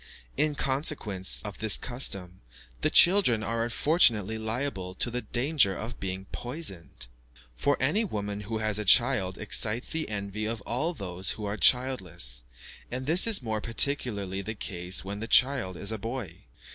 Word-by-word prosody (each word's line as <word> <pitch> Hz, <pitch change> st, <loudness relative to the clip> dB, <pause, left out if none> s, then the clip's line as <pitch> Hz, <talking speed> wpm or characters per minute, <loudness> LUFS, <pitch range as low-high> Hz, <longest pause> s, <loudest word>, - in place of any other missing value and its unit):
In 150 Hz, -1 st, 0 dB
consequence 130 Hz, -, +1 dB
of 105 Hz, -3 st, -8 dB
this 110 Hz, -2 st, +3 dB
custom, 100 Hz, -8 st, -2 dB, 0.4 s
the -, -, +2 dB
children 175 Hz, -, +5 dB
are 115 Hz, +1 st, -2 dB
unfortunately 115 Hz, -, +2 dB
liable 110 Hz, -5 st, -4 dB
to 120 Hz, -, -2 dB
the 125 Hz, +1 st, -3 dB
danger 120 Hz, -2 st, +1 dB
of 115 Hz, 0 st, -7 dB
being 95 Hz, 0 st, -5 dB
poisoned; 120 Hz, -, -5 dB, 0.5 s
for 145 Hz, -, 0 dB
any 155 Hz, +12 st, +1 dB
woman 105 Hz, -, -4 dB
who 105 Hz, +2 st, -5 dB
has 110 Hz, -1 st, -1 dB
a -, -, -2 dB
child 105 Hz, -3 st, +4 dB
excites 105 Hz, +2 st, -1 dB
the 160 Hz, -1 st, -2 dB
envy 105 Hz, 0 st, -4 dB
of 115 Hz, -1 st, -4 dB
all 155 Hz, +12 st, -3 dB
those 95 Hz, -4 st, -4 dB
who 105 Hz, -, -6 dB
are 100 Hz, +1 st, -3 dB
childless; 95 Hz, -, +1 dB, 0.5 s
and 130 Hz, +1 st, -4 dB
this 170 Hz, -, +5 dB
is 215 Hz, -, +4 dB
more 110 Hz, -2 st, -3 dB
particularly 110 Hz, -6 st, +1 dB
the 110 Hz, +3 st, -6 dB
case 90 Hz, -3 st, -2 dB
when 100 Hz, +1 st, -5 dB
the 115 Hz, -, -5 dB
child 125 Hz, -9 st, +3 dB
is 100 Hz, -, -3 dB
a 110 Hz, -, -4 dB
boy. 115 Hz, -1 st, -7 dB
110 Hz, 160 wpm, -27 LUFS, 100-130 Hz, 0.5 s, children